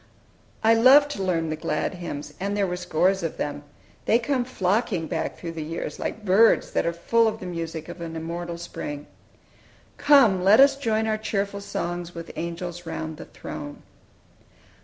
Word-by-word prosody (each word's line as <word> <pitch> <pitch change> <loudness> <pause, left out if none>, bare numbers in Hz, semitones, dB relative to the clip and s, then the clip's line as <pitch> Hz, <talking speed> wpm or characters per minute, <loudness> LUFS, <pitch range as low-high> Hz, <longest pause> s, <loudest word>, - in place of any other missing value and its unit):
I 225 +1 +6
loved 270 +5 +6
to 200 - -4
learn 165 -4 0
the - - -1
glad 155 +2 -2
hymns, 150 -5 -6
and 200 +2 -2
there 200 - +2
were 180 -1 -2
scores 180 +2 +1
of 165 -2 -4
them. 145 0 -4 0.4
They 225 - +4
come 250 +1 -1
flocking 200 -6 0
back 160 0 -3
through 170 - -6
the 165 -1 -6
years, 155 -1 -5
like 215 0 -4
birds 210 +4 +4
that - - 0
are - - +2
full 225 +7 +2
of 220 - -2
the - - -8
music 165 -2 -5
of 175 - -9
an 165 -1 -6
immortal 170 +1 -5
spring! 145 -4 -6 0.9
"Come, 255 -11 +5
let 200 +5 +6
us 275 0 +7
join 220 -5 0
our 215 -1 0
cheerful 200 -2 -2
songs 175 -3 -4
With 165 0 -7
angels 170 +1 -5
round 160 -1 -5
the - - -9
throne." 145 -1 -8
180 Hz, 180 wpm, -25 LUFS, 165-215 Hz, 0.9 s, us